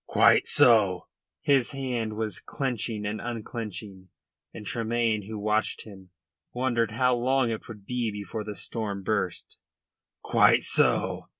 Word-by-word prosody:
"Quite - - +4
so," 100 -7 +4 0.4
said - - +2
O'Moy, - - +8
his 125 - -1
hand 125 -5 -3 0.3
clenching 115 -6 -3
and 105 +1 -3
unclenching, 105 -5 -6 0.4
and 105 - -10
Tremayne, 115 -1 -1
who 110 0 -6
watched 105 +1 0
him, 95 -4 -13 0.4
wondered 120 -3 0
how 125 +3 +2
long 125 0 +1
it 110 - -5
would 105 -4 -11
be 125 -1 -1
before 105 +1 -5
the 105 0 -6
storm 100 -4 -3
burst. 100 -3 -2 0.6
"Quite - - +4
so. - - +1
110 Hz, 135 wpm, -27 LUFS, 105-120 Hz, 0.6 s, O'Moy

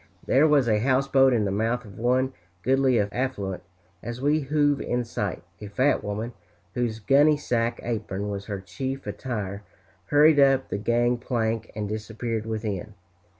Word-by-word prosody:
There 140 +5 +4
was 145 -5 +3
a 105 -2 +3
houseboat 135 +2 +3
in 115 -4 +2
the 100 - -1
mouth 115 +4 -1
of 100 -1 -12
one 130 +3 +1 0.3
goodly 130 -1 +3
affluent. 100 -2 -2 0.4
As 120 +1 -6
we 145 +3 +2
hove 145 0 +1
in 125 0 -1
sight, 105 -5 -4 0.2
a 105 - -6
fat 130 +8 +1
woman, 110 +4 -4 0.4
whose 120 -3 -1
gunny 145 +7 +4
sack 120 -4 -1
apron 105 -4 -3
was 100 -1 -5
her 100 -2 -4
chief 135 +7 -5
attire, 105 -6 -4 0.4
hurried 150 +1 +5
up 135 -1 +4
the 100 - -2
gang 120 +3 +1
plank 115 -2 -2
and 105 -1 -3
disappeared 110 +1 -4
within. 105 -2 -4
120 Hz, 155 wpm, -25 LUFS, 105-135 Hz, 0.4 s, hurried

